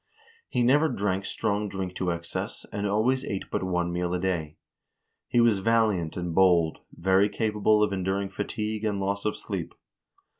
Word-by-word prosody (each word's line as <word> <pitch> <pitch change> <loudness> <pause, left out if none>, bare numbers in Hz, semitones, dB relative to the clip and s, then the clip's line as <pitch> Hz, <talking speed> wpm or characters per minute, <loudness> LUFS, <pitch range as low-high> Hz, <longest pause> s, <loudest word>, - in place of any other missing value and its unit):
He 125 - +1
never 145 +6 +4
drank 100 -5 -1
strong 105 0 -1
drink 95 -2 -4
to 90 - -1
excess, 85 0 -4
and 100 0 -2
always 115 +6 +1
ate 100 -2 -3
but - - -1
one 90 -2 -1
meal 90 0 -1
a - - -1
day. 85 -5 -2 0.7
He 120 - +2
was 115 -4 +4
valiant 105 -7 +1
and 90 -2 -3
bold, 85 -3 +4
very 95 +3 +3
capable 105 -1 +2
of 105 - +1
enduring 95 +1 -1
fatigue 105 +2 -3
and 105 -2 0
loss 100 +1 -2
of 105 - 0
sleep." - - -5
100 Hz, 165 wpm, -27 LUFS, 90-105 Hz, 0.7 s, never